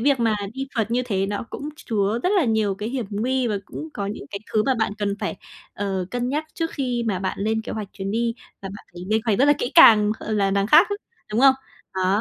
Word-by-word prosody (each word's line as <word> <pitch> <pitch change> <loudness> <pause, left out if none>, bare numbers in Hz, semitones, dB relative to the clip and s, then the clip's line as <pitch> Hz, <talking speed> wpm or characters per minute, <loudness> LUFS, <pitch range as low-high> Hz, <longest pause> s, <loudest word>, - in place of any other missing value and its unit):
việc 270 0 +2
mà 225 -2 +2 0.2
đi 270 0 -4
phượt 225 0 0
như 250 +1 +1
thế 195 -5 -1
nó 205 +2 -3
cũng 290 - -5
chứa 215 -4 -1
rất - - +2
là 360 - +4
nhiều 220 -4 +1
cái 210 +3 -4
hiểm 245 -4 -3
nguy, 250 +5 0
và 210 -3 0
cũng 315 - -7
có 200 -1 -3
những 200 -8 -5
cái 200 - -4
thứ 215 - +3
mà 265 - +2
bạn 220 -2 +1
cần 200 -1 0
phải, - - -3 0.4
ờ, 195 -2 -2
cân 245 0 -2
nhắc 300 +3 -1
trước 330 0 -2
khi 250 -3 -2
mà 195 -4 0
bạn 190 0 -3
lên 220 +2 0
kế - - -6
hoạch 210 -3 -5
chuyến 195 0 -5
đi. 230 +1 0 0.3
Và 195 - -5
bạn 200 - -10
phải 175 0 -9
lên 220 +1 +2
hoạch 215 -4 +1
rất 270 - +5
là 290 - +6
kỹ 245 - -2
càng, 215 -10 +8
ờ, 220 - -4
là 200 -2 +2
đằng 200 +1 +1
khác - - +7
á, - - +1 0.4
đúng 220 +4 +1
không? 270 -1 +7 0.4
Đó. 190 +2 +2
220 Hz, 265 wpm, -23 LUFS, 200-250 Hz, 0.4 s, càng